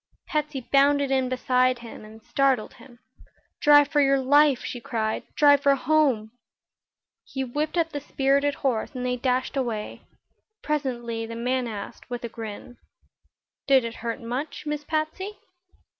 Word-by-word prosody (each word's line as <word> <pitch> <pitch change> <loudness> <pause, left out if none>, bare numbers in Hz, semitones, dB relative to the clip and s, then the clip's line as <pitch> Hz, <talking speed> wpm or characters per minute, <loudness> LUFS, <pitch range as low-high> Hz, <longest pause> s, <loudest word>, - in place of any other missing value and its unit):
Patsy 300 -4 -2
bounded 280 +2 +3
in 260 -1 +1
beside 255 0 +2
him 225 - -10
and 220 +1 -14
startled 265 -3 +1
him. 245 -3 -16 0.6
"Drive 290 -1 +6
for 295 -2 +3
your 275 0 +4
life!" 285 0 +4
she 245 - -5
cried. 220 -2 -2
"Drive 285 -1 +5
for 280 -1 +4
home!" 275 -8 +1 0.9
He 265 - -4
whipped 295 +6 -3
up 330 -1 +1
the 290 - -4
spirited 280 +1 +1
horse 245 -1 0
and 250 0 -3
they 250 0 0
dashed 255 +2 -1
away. 235 -6 -3 0.6
Presently 240 -6 -2
the 230 - -7
man 250 +1 -1
asked, 210 +1 -8
with 245 0 -5
a 235 - -4
grin: 225 +1 -8 0.9
"Did 270 -2 +5
it 230 0 -6
hurt 235 +1 -3
much, 255 +7 -5
Miss 300 0 -3
Patsy?" 320 +7 -3
265 Hz, 150 wpm, -25 LUFS, 235-290 Hz, 0.9 s, Drive